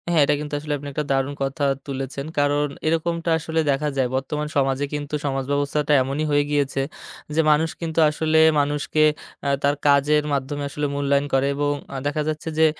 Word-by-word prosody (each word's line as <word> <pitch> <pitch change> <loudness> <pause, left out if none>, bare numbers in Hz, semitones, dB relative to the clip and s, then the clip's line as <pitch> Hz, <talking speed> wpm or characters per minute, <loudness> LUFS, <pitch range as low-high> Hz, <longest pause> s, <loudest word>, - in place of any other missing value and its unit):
হ্যাঁ, 170 -3 +4
এটা 150 - +2
কিন্তু 150 0 -6
আসলে 150 0 -3
আপনি 145 +1 -9
একটা 150 +2 -2
দারুণ 135 +1 +1
কথা 135 +2 -2 0.2
তুলেছেন। 135 0 -4
কারণ 145 +1 +2 0.2
এরকমটা 165 +1 0
আসলে 160 +1 -2
দেখা 145 +2 0
যায়। 130 -2 +2
বর্তমান 150 +3 -2
সমাজে 135 0 +1
কিন্তু 145 0 -4
সমাজব্যবস্থাটা 145 +2 0
এমনই 140 +4 -2
হয়ে 145 0 +3
গিয়েছে 140 -2 +1 0.5
যে, 160 - +4
মানুষ 160 +2 +3
কিন্তু 165 -1 -2
আসলে 160 +1 +1 0.2
মানুষকে 145 +1 +1 0.4
এ - - 0 0.2
তার 140 +1 +3
কাজের 145 +1 +4
মাধ্যমে 140 +1 -2
আসলে 145 +1 -3
মূল্যায়ন 140 0 +1
করে 135 +1 +3
এবং 145 0 0 0.2
আ - - -2
দেখা 145 +1 -1
যাচ্ছে 155 +1 -3
যে, 160 - +6
145 Hz, 180 wpm, -23 LUFS, 140-150 Hz, 0.5 s, যে